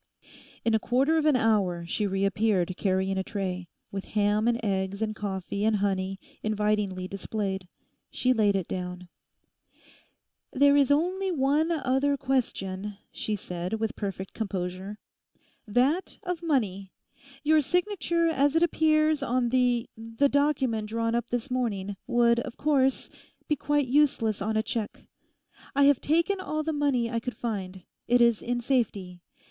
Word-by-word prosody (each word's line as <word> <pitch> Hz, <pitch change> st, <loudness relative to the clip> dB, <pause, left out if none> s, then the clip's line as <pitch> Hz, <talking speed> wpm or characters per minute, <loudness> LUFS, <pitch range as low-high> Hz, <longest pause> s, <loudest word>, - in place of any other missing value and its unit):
In 230 Hz, -, +2 dB
a 220 Hz, -, +4 dB
quarter 265 Hz, +8 st, +2 dB
of 310 Hz, -, +1 dB
an 300 Hz, -, +5 dB
hour 200 Hz, -8 st, +1 dB
she 205 Hz, +4 st, -1 dB
reappeared 195 Hz, -1 st, +1 dB
carrying 190 Hz, 0 st, 0 dB
a -, -, -1 dB
tray, 185 Hz, -3 st, -4 dB, 0.2 s
with 195 Hz, -1 st, -5 dB
ham 210 Hz, +1 st, +2 dB
and 235 Hz, -1 st, +2 dB
eggs 195 Hz, -1 st, -1 dB
and 215 Hz, -1 st, -2 dB
coffee 200 Hz, -1 st, -4 dB
and 220 Hz, 0 st, +3 dB
honey 195 Hz, -1 st, -1 dB, 0.2 s
invitingly 210 Hz, -3 st, 0 dB
displayed. 195 Hz, -1 st, -4 dB, 0.4 s
She 255 Hz, 0 st, +1 dB
laid 210 Hz, -4 st, +2 dB
it 190 Hz, -3 st, -1 dB
down. 180 Hz, -1 st, -5 dB, 1.4 s
'There 285 Hz, +1 st, +5 dB
is 280 Hz, -2 st, +4 dB
only 365 Hz, +6 st, +1 dB
one 295 Hz, +1 st, +2 dB
other 280 Hz, -2 st, +1 dB
question,' 210 Hz, -7 st, -2 dB
she 215 Hz, -, -3 dB
said, 180 Hz, -1 st, -5 dB
with 220 Hz, +1 st, -2 dB
perfect 195 Hz, -2 st, -5 dB
composure—'that 210 Hz, -, -3 dB
of 360 Hz, -3 st, -3 dB
money. 210 Hz, -, -1 dB, 0.5 s
Your 310 Hz, +1 st, +4 dB
signature 345 Hz, +1 st, 0 dB
as 290 Hz, -2 st, +2 dB
it 325 Hz, -, +4 dB
appears 310 Hz, -2 st, +3 dB
on 245 Hz, -1 st, 0 dB
the—the 240 Hz, 0 st, +1 dB
document 265 Hz, -7 st, +1 dB
drawn 230 Hz, +1 st, -1 dB
up 235 Hz, 0 st, -1 dB
this 245 Hz, +2 st, -3 dB
morning, 205 Hz, -6 st, -2 dB
would, 235 Hz, 0 st, +3 dB
of 235 Hz, -, -6 dB
course, 270 Hz, -3 st, +1 dB, 0.4 s
be 300 Hz, -, +2 dB
quite 290 Hz, +1 st, +1 dB
useless 245 Hz, -6 st, +2 dB
on 220 Hz, +2 st, 0 dB
a 220 Hz, -, +1 dB
cheque. 220 Hz, -2 st, -4 dB, 0.7 s
I 280 Hz, -, +4 dB
have 280 Hz, -2 st, +5 dB
taken 335 Hz, +6 st, +1 dB
all 310 Hz, -4 st, -2 dB
the 320 Hz, +1 st, -2 dB
money 280 Hz, -5 st, +1 dB
I 230 Hz, -, 0 dB
could 250 Hz, +2 st, -6 dB
find; 190 Hz, -5 st, -4 dB, 0.2 s
it 245 Hz, +1 st, +4 dB
is 235 Hz, -2 st, +4 dB
in 245 Hz, 0 st, -2 dB
safety. 200 Hz, -8 st, -1 dB
230 Hz, 145 wpm, -27 LUFS, 195-280 Hz, 1.4 s, an